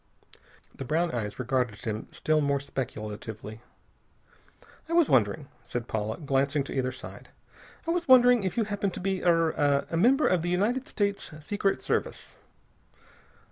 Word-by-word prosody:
The - - -7
brown 165 +5 0
eyes 110 -4 -4
regarded 125 -3 -1
him 110 -1 -3
still 155 0 +1
more 140 -1 +1
speculatively. 110 -4 -6 1.3
"I - - -2
was 340 -3 +4
wondering 115 +2 +2
" 120 - -33
said 120 -1 -5
Paula, 110 0 -2
glancing 140 -1 0
to - - -7
either 130 -1 0
side, 130 0 -10 0.6
"I - - +2
was 345 0 -1
wondering 250 -2 +7
if 190 +1 -3
you 230 - +3
happen 205 -1 -1
to - - -7
be 190 0 -2
er 165 -2 +3 0.4
a - - -1
member 260 - +4
of 180 -3 +2
the 175 - -2
United 230 - 0
States 200 -7 -2 0.2
Secret 205 +1 0
Service." - - -2
155 Hz, 155 wpm, -28 LUFS, 120-200 Hz, 1.3 s, wondering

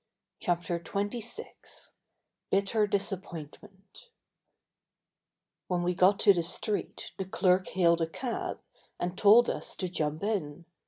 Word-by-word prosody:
CHAPTER 175 0 -1
XXVI 210 - -3 0.6
BITTER 200 +2 +2
DISAPPOINTMENT 195 - -5 1.6
When 175 -1 0
we 180 +1 +1
got 185 +3 +4
to 200 - +7
the 175 - 0
street 200 +5 -3
the 190 - -2
clerk 185 0 +2
hailed 170 -2 +3
a 165 - +1
cab 235 +8 -4 0.4
and 175 +1 -2
told 215 +5 +6
us - - -2
to 185 - -2
jump 155 -2 -2
in. 175 -7 -2
190 Hz, 115 wpm, -29 LUFS, 175-205 Hz, 1.6 s, to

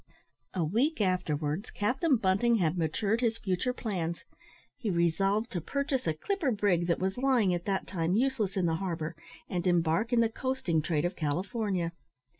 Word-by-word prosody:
A 180 - +1
week 245 - +1
afterwards, 170 -3 0
Captain 265 +8 +1
Bunting 215 +3 +3
had 175 -6 +1
matured 195 +7 0
his 230 -2 +1
future 195 +3 -1
plans. 180 -9 -3 0.5
He 235 -6 -3
resolved 195 +6 +1
to 175 - -2
purchase 275 - -1
a 160 - +1
clipper 335 - -1
brig 200 -6 +1
that 170 - +2
was 190 +5 -2
lying 250 -8 +3
at 175 0 -3
that 195 -1 -1
time 175 -1 -1
useless 230 -5 +1
in 185 - +2
the 165 -1 +1
harbour, 165 -3 -3 0.3
and 180 0 -2
embark 175 +5 +2
in 240 - +4
the 230 - +4
coasting 225 -10 -1
trade 155 0 0
of 175 +2 -1
California. 180 - -1
190 Hz, 170 wpm, -30 LUFS, 170-230 Hz, 0.5 s, in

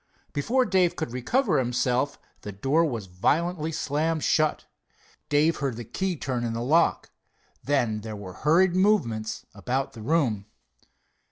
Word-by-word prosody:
Before 245 - +1
Dave 185 -5 +2
could 160 -7 -4
recover 195 - +1
himself 125 +2 0 0.2
the 105 - -6
door 135 - +1
was 120 -10 -2
violently 155 - 0
slammed 155 +1 -1
shut. 155 -1 +1 0.6
Dave 150 +3 +3
heard 135 -5 -2
the 120 - -6
key 190 - -2
turn 130 -5 -3
in 115 -1 -2
the 115 +1 -3
lock. 160 +7 +2 0.5
Then 120 -7 +1
there 110 0 -6
were 100 -3 -8
hurried 175 - +3
movements 140 - +1
about 130 +2 -2
the 115 - -10
room. 115 -7 0
145 Hz, 145 wpm, -26 LUFS, 115-165 Hz, 0.6 s, Dave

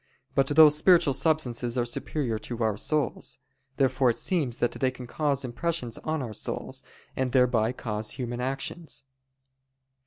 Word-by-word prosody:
But 135 -1 +3
those 150 +1 +7
spiritual 165 -2 +5
substances 130 -4 0
are 120 - +2
superior 120 -1 -2
to 120 +1 -4
our 110 -2 +1
souls. 150 +7 -1 0.4
Therefore 135 -1 +3
it 115 - 0
seems 145 -10 0
that 120 - +1
they 130 - 0
can 125 -1 -9
cause 140 0 -1
impressions 125 -1 -3
on 155 -3 -2
our 115 -3 -5
souls, - - -4 0.3
and 130 -1 -1
thereby 125 -3 +3
cause 105 -3 -4
human 120 -2 -4
actions. 135 +5 -3
130 Hz, 150 wpm, -27 LUFS, 120-150 Hz, 0.4 s, those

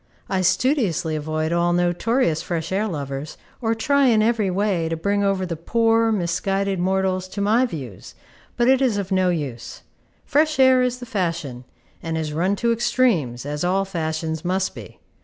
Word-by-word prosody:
I 190 -1 0
studiously 190 - +1
avoid 155 +1 -2
all 170 0 +2
notorious 175 - +1
fresh 165 -1 -4
air 205 +3 0
lovers, 140 -4 -5 0.2
or 225 -1 0
try 280 +4 +2
in 220 -3 +4
every 220 -3 +1
way 185 -3 0
to 165 - -2
bring 200 +4 0
over 195 -1 +1
the 170 -2 -4
poor, 225 +6 +2
misguided 195 0 -1
mortals 185 0 0
to 195 - -7
my 220 +6 +3
views; 130 - -8 0.4
but 240 0 +2
it 265 0 +4
is 245 -6 +2
of 195 -1 -4
no 185 -1 +2
use. 135 -9 -4 0.4
Fresh 305 +1 +2
air 260 -1 +5
is 250 0 0
the 250 - -8
fashion, 165 - -3 0.4
and 165 -1 -3
is 155 -2 -3
run 180 +6 +1
to 235 +3 0
extremes, 215 - +1
as 150 +2 -3
all 190 +2 +1
fashions 160 -3 -3
must 190 +2 -1
be. - - -11
185 Hz, 175 wpm, -22 LUFS, 160-225 Hz, 0.4 s, air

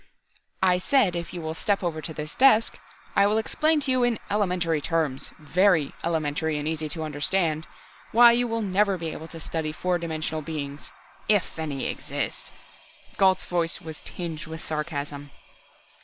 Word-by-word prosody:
"I 180 -1 +4
said 205 -3 +3
if 170 0 -4
you 175 - -6
will 160 0 -3
step 195 +4 0
over 160 -3 -2
to 160 - -4
this 150 -1 -6
desk 240 -4 +4 0.4
I 200 0 +5
will 210 +1 +2
explain 310 +7 +2
to 270 - 0
you 255 -1 +3
in 240 -2 +2
elementary 180 -6 +1
terms 155 -5 -1
very 165 0 +2
elementary 160 -1 0
and 145 +1 -3
easy 155 -1 -2
to 160 +2 -3
understand 155 +2 0 0.4
why 235 +1 +8
you 240 +1 +2
will 230 -1 -1
never 200 0 +2
be 165 -2 -4
able 160 - -7
to 165 0 -10
study 160 -1 -3
four 180 +3 -1
dimensional 160 -1 -3
beings 145 -2 -6 0.4
if 205 -5 +2
any 145 -4 -3
exist!" - - -4 0.7
Gault's 190 -1 +4
voice 170 -1 0
was 160 -4 -8
tinged 165 -4 -6
with 160 0 -7
sarcasm. 145 -2 -4
165 Hz, 165 wpm, -26 LUFS, 155-195 Hz, 0.7 s, why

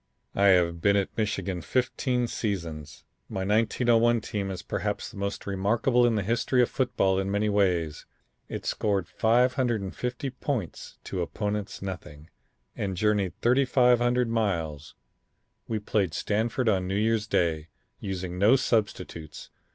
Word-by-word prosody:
"I 100 - +2
have 85 -3 +4
been 100 +2 +4
at 100 -1 -1
Michigan 100 -4 -2
fifteen 125 - 0
seasons. 85 - -4 0.3
My 95 - -3
1901 115 +3 +3
team 100 -2 -3
is 95 -2 -5
perhaps - - -3
the - - -12
most 100 0 -3
remarkable 115 +6 +2
in 115 - +1
the 105 - 0
history 120 +4 +2
of - - -1
football 95 -8 +1
in 95 0 -2
many 105 +1 +1
ways. 90 -7 0 0.4
It - - -5
scored 100 -5 0
550 125 +1 0
points 125 - -4
to 95 - -4
opponents' 105 +3 -3
nothing, 80 -5 -8 0.4
and 95 -2 -3
journeyed 105 -3 0
3500 125 -1 +3
miles. 85 -10 -2 0.7
We 110 - -1
played 100 -5 -1
Stanford 115 +4 -1
on 95 -4 +2
New 95 - -2
Year's 110 0 +1
day, 80 -5 0 0.3
using 90 -2 -4
no 105 +7 +6
substitutes. 105 - -2
105 Hz, 135 wpm, -27 LUFS, 95-120 Hz, 0.7 s, no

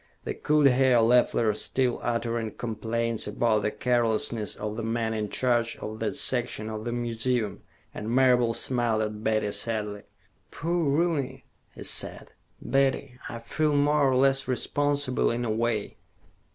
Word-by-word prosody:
They - - -3
could 150 -1 +2
hear 130 -1 +4
Leffler 115 -1 +3
still 125 +3 -1
uttering 115 -2 -2
complaints 115 0 -1
about 110 +1 +1
the 105 - 0
carelessness 115 0 0
of 105 0 -5
the 115 - -4
men 115 0 -1
in 105 -1 -2
charge 120 -1 0
of 110 +1 -7
that 110 +3 -2
section 120 -5 0
of 110 +1 -6
the 120 - -2
museum, 120 -3 -2 0.3
and 105 - -5
Marable 125 -2 +3
smiled 120 -4 +1
at 105 0 -5
Betty 110 -2 +1
sadly. 105 -1 -2 0.5
"Poor 165 +1 -4
Rooney," 140 -3 0 0.3
he - - -8
said. - - -2 0.3
"Betty, 135 -1 0
I 120 - -5
feel 150 +6 -1
more 145 0 +3
or 130 - +2
less 135 +1 +3
responsible, 145 +1 0
in 120 +1 -2
a 110 - -1
way." 110 -1 -1
120 Hz, 150 wpm, -27 LUFS, 110-130 Hz, 0.5 s, hear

